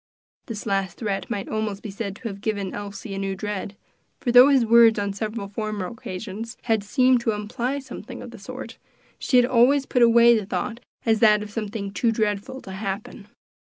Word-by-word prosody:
This 220 -4 -6
last 195 -4 -1
threat 205 -4 -3
might 205 -4 -3
almost 215 -2 -3
be 210 - -5
said 200 -1 -5
to 235 +2 -7
have 200 -2 -7
given 205 -3 -2
Elsie 200 +1 -6
a 195 - -4
new 195 0 -2
dread; 205 0 -5 0.4
for 245 - -1
though 250 +3 +9
his 265 -4 +4
words 230 0 +6
on 200 -1 -1
several 215 0 -4
former 210 -1 -4
occasions 215 +2 -7
had 225 -3 +1
seemed 250 +4 +3
to 225 -2 0
imply 235 +6 -3
something 270 -1 -8
of - - -9
the - - -11
sort, - - -8 0.4
she 255 - +2
had 245 - +6
always 260 +3 +4
put 250 - 0
away 235 0 +7
the 210 -3 -2
thought 235 +1 -3 0.3
as 220 -2 +3
that 210 -2 +5
of 210 - -9
something 205 -2 -4
too 230 +2 +1
dreadful 220 +4 -2
to 190 - -9
happen. 200 +1 -5
215 Hz, 200 wpm, -24 LUFS, 200-235 Hz, 0.4 s, though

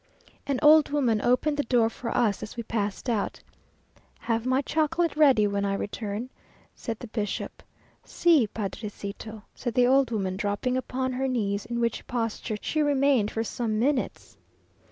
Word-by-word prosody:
An 280 -2 0
old 305 0 +7
woman 250 -7 +1
opened 270 +5 +2
the - - +2
door 235 -2 +3
for 230 +1 -5
us 210 -4 +2
as 215 - -8
we 235 - -3
passed 210 0 -3
out. 220 -4 -1 0.8
"Have 230 +1 -1
my 260 +2 +2
chocolate 325 +3 0
ready 270 -8 +5
when 200 0 0
I 200 0 0
return," 210 +4 -4 0.4
said 230 -3 -5
the 245 - -8
bishop, 215 -3 -4 0.4
"Si, 320 -10 +3
padrecito!" 205 +1 -6
said 240 -3 -4
the 250 -1 +5
old 265 0 +4
woman, 190 -5 -2
dropping 205 +5 -1
upon 260 0 -2
her 265 +1 -1
knees, 210 -4 -1
in 235 0 -3
which 235 -1 -1
posture 225 -2 -2
she 310 - 0
remained 275 -6 +3
for 225 - -2
some 225 -1 -2
minutes. 260 +3 -1
235 Hz, 160 wpm, -27 LUFS, 210-265 Hz, 0.8 s, old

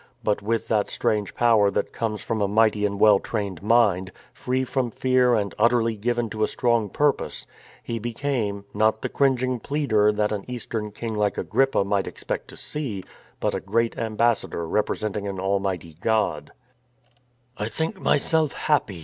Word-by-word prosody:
But 105 -1 +1
with 115 +2 -1
that 105 -2 +1
strange 105 -2 -1
power 115 -4 +4
that - - -2
comes 110 -2 -3
from 110 -2 -2
a 100 - +2
mighty 105 0 +3
and 100 0 -5
well 105 -2 +6
trained 100 -6 -4
mind, 105 -4 +3 0.2
free 130 +1 -1
from 130 -1 -1
fear 125 +1 +3
and 100 -2 -1
utterly 115 0 +3
given 120 +2 -1
to 110 - -4
a - - +3
strong 120 -4 +1
purpose, 145 +5 0 0.4
he 115 -1 -3
became, 115 -4 -2
not 110 +1 +2
the - - -1
cringing 130 -2 +1
pleader 110 -7 +2
that 105 0 0
an 105 -2 -2
Eastern 115 -3 -4
king 110 +2 -5
like 105 -1 0
Agrippa 125 +6 +2
might 100 0 0
expect - - -5
to - - -13
see, 120 -11 -4 0.4
but - - 0
a - - -1
great 115 +4 0
ambassador 115 -6 0
represent 105 +3 -1
ing 100 -1 -3
an 95 -1 -4
Almighty 95 -3 -1
God, 110 -1 0 0.5
" 125 0 -39
I 105 +1 -2
think 160 - -3
myself 155 +1 +2
happy. 125 - 0
110 Hz, 170 wpm, -24 LUFS, 105-120 Hz, 0.5 s, well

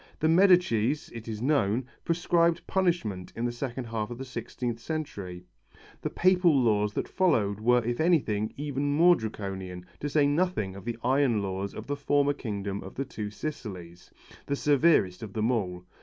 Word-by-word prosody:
The 155 - +2
Medicis, 160 - +4
it 115 -1 -9
is 110 0 -4
known, 125 -4 +2 0.2
prescribed 170 0 +2
punishments 170 - -1
in 115 - -2
the 120 - 0
second 125 +1 -4
half 115 -2 -3
of 120 - -6
the 135 - -6
sixteenth 125 -2 -4
century; 100 - -5 0.6
the - - -2
Papal 180 -5 +4
laws 105 -3 +2
that - - -2
followed 110 - +1
were 120 +2 +3
if 120 0 -2
anything 135 -11 +2
even 145 0 -1
more 175 +4 +6
Draconian, 95 - -5
to 145 - -3
say 145 0 +3
nothing 145 - 0
of 100 - -10
the 120 -1 -3
iron 130 -5 +2
laws 95 +1 -4
of - - -7
the 145 - -2
former 145 0 +2
kingdom 100 -6 -4
of 95 - -10
the 135 - -2
Two 110 -5 -5
Sicilies, 95 - -7 0.4
the 140 - 0
severest 140 - +3
of 105 -3 -7
them 110 +2 +1
all. 90 -6 -2
120 Hz, 170 wpm, -28 LUFS, 105-150 Hz, 0.6 s, more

